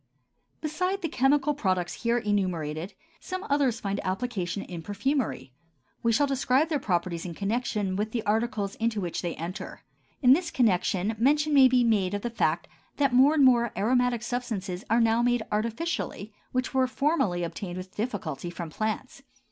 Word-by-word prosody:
Besides 365 Hz, +5 st, -1 dB
the -, -, +1 dB
chemical 280 Hz, +2 st, +2 dB
products 185 Hz, -9 st, -1 dB
here 235 Hz, 0 st, +2 dB
enumerated, 185 Hz, -6 st, -2 dB, 0.2 s
some 370 Hz, +2 st, -5 dB
others 270 Hz, -5 st, +2 dB
find 200 Hz, 0 st, -2 dB
application 195 Hz, -2 st, -2 dB
in 175 Hz, -2 st, -7 dB
perfumery; 205 Hz, -, -2 dB, 0.5 s
we 230 Hz, -, +2 dB
shall 285 Hz, +6 st, +3 dB
describe 270 Hz, +2 st, +1 dB
their 300 Hz, -3 st, 0 dB
properties 175 Hz, -5 st, -1 dB
in 175 Hz, -2 st, -6 dB
connection 205 Hz, -1 st, -1 dB
with 210 Hz, +2 st, -1 dB
the 230 Hz, -2 st, -2 dB
articles 210 Hz, -2 st, 0 dB
into 225 Hz, -1 st, 0 dB
which 175 Hz, -4 st, -3 dB
they 175 Hz, -2 st, -3 dB
enter. 170 Hz, +4 st, -7 dB, 0.4 s
In 255 Hz, 0 st, +8 dB
this 340 Hz, +4 st, +1 dB
connection 200 Hz, -2 st, +1 dB
mention 295 Hz, +5 st, +3 dB
may 270 Hz, -2 st, +8 dB
be 250 Hz, -1 st, +3 dB
made 205 Hz, -4 st, +2 dB
of 205 Hz, -, -4 dB
the 240 Hz, -, -2 dB
fact 230 Hz, -, 0 dB, 0.3 s
that 280 Hz, -3 st, +2 dB
more 270 Hz, +5 st, +6 dB
and 285 Hz, -3 st, +5 dB
more 240 Hz, -2 st, +4 dB
aromatic 245 Hz, +1 st, +2 dB
substances 215 Hz, -6 st, -3 dB
are 230 Hz, +2 st, +4 dB
now 230 Hz, +1 st, +3 dB
made 245 Hz, -1 st, +2 dB
artificially 220 Hz, -, -2 dB, 0.2 s
which 255 Hz, +1 st, -1 dB
were 260 Hz, -1 st, +3 dB
formerly 255 Hz, -, 0 dB
obtained 175 Hz, +2 st, -5 dB
with 185 Hz, 0 st, -8 dB
difficulty 190 Hz, -, -3 dB
from 170 Hz, -2 st, -7 dB
plants. 220 Hz, -, -3 dB
225 Hz, 165 wpm, -27 LUFS, 185-260 Hz, 0.5 s, In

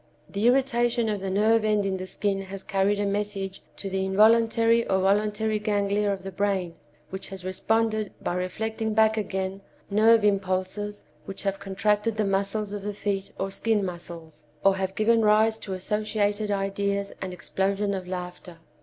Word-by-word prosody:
The 205 Hz, +4 st, 0 dB
irritation 240 Hz, -3 st, +2 dB
of 205 Hz, -2 st, -2 dB
the 195 Hz, -, -3 dB
nerve 215 Hz, +3 st, +3 dB
end 210 Hz, -2 st, +2 dB
in 190 Hz, -1 st, -1 dB
the 185 Hz, 0 st, -6 dB
skin 195 Hz, 0 st, -1 dB
has 195 Hz, 0 st, -8 dB
carried 200 Hz, +1 st, +1 dB
a 205 Hz, -, +1 dB
message 200 Hz, -1 st, -2 dB, 0.2 s
to 200 Hz, -, -5 dB
the 190 Hz, 0 st, -1 dB
involuntary 225 Hz, +3 st, +4 dB
or 190 Hz, -, +3 dB
voluntary 210 Hz, +2 st, +1 dB
ganglia 205 Hz, -1 st, +1 dB
of 195 Hz, -1 st, -4 dB
the 195 Hz, -, -6 dB
brain 190 Hz, -3 st, -1 dB, 0.4 s
which 190 Hz, 0 st, -4 dB
has 190 Hz, -1 st, -8 dB
responded 215 Hz, +2 st, 0 dB
by -, -, -2 dB
reflecting 220 Hz, +5 st, -2 dB
back 220 Hz, 0 st, +4 dB
again 190 Hz, -2 st, -3 dB, 0.3 s
nerve 220 Hz, +1 st, +5 dB
impulses 195 Hz, +1 st, -1 dB, 0.2 s
which 195 Hz, -, -6 dB
have 195 Hz, -1 st, -1 dB
contracted 210 Hz, +3 st, 0 dB
the 215 Hz, -, +1 dB
muscles 200 Hz, +1 st, -1 dB
of 205 Hz, -, -4 dB
the 205 Hz, +1 st, -4 dB
feet 200 Hz, -1 st, -2 dB
or 195 Hz, 0 st, -2 dB
skin 215 Hz, 0 st, 0 dB
muscles, 170 Hz, -3 st, -8 dB, 0.2 s
or 195 Hz, 0 st, +5 dB
have 190 Hz, 0 st, -2 dB
given 225 Hz, +1 st, +3 dB
rise 220 Hz, +1 st, +4 dB
to 195 Hz, -, -6 dB
associated 210 Hz, +2 st, -1 dB
ideas 200 Hz, 0 st, -1 dB
and 190 Hz, -1 st, -4 dB
explosion 195 Hz, +3 st, -1 dB
of 185 Hz, -2 st, -4 dB
laughter. 180 Hz, -1 st, -6 dB
200 Hz, 170 wpm, -26 LUFS, 190-215 Hz, 0.4 s, nerve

